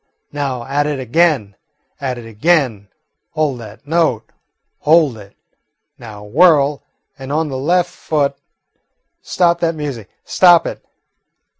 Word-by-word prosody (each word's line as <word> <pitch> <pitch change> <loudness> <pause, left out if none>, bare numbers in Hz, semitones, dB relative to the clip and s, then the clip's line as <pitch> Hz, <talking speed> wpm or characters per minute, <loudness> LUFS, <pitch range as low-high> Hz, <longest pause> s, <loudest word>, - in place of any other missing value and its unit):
"Now, 135 -4 -3
at 145 +3 -1
it 145 -2 -2
again, 130 - +1 0.4
at 130 -3 -3
it 120 - -9
again! 115 - 0 0.5
Hold 150 -5 -1
that 110 +3 -12
note, 145 -9 0 0.5
hold 155 -4 +3
it! 100 -1 -15 0.6
Now 105 -3 -10
whirl, 145 - +3 0.4
and 135 +1 -7
on 155 +1 0
the 135 - -4
left 175 +5 +1
foot. 145 -3 -1 0.9
Stop 170 -1 +1
that 165 -1 0
music, 140 -9 -6 0.2
stop 175 -2 +5
it! - - -6
140 Hz, 125 wpm, -17 LUFS, 120-160 Hz, 0.9 s, stop